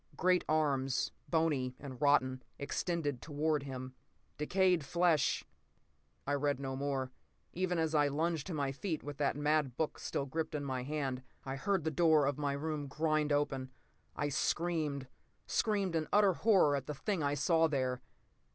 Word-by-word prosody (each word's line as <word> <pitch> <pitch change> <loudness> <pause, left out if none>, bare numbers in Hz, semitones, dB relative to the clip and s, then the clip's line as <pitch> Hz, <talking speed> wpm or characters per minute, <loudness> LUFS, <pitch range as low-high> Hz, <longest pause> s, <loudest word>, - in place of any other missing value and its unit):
Great 180 +1 +3
arms, 140 -4 +1 0.2
bony 150 -6 +1
and 130 -4 -9
rotten, 130 -3 +3 0.2
extended 145 -2 -2
toward 150 0 0
him. 130 -2 -6 0.5
Decayed 180 +1 +2
flesh—" 170 0 +2 0.8
I 145 - 0
read 145 -1 +1
no 135 -1 -3
more. 135 -1 -2 0.4
Even 180 0 0
as 160 -1 0
I 145 -2 +4
lunged 155 +1 -1
to 185 - -4
my 140 -2 0
feet, 155 +3 -3
with 145 -1 -6
that 145 -2 +1
mad 145 -3 +1
book 160 - -1
still 140 - -2
gripped 155 +3 -3
in 145 - -2
my 130 -2 -2
hand, 135 -2 -2 0.2
I 135 0 -3
heard 185 +5 0
the 160 - 0
door 155 -1 +4
of 140 +1 -1
my 145 -1 0
room 150 0 -3
grind 155 +1 0
open. 135 -3 0 0.5
I 145 - -1
screamed, 150 -2 0 0.4
screamed 200 -5 0
in 155 -1 0
utter 205 -2 +5
horror 185 -7 +4
at 135 -2 -4
the 150 - -4
thing 190 +5 -2
I 145 0 +1
saw 165 +2 +3
there. 130 -4 -1
145 Hz, 165 wpm, -34 LUFS, 140-160 Hz, 0.8 s, utter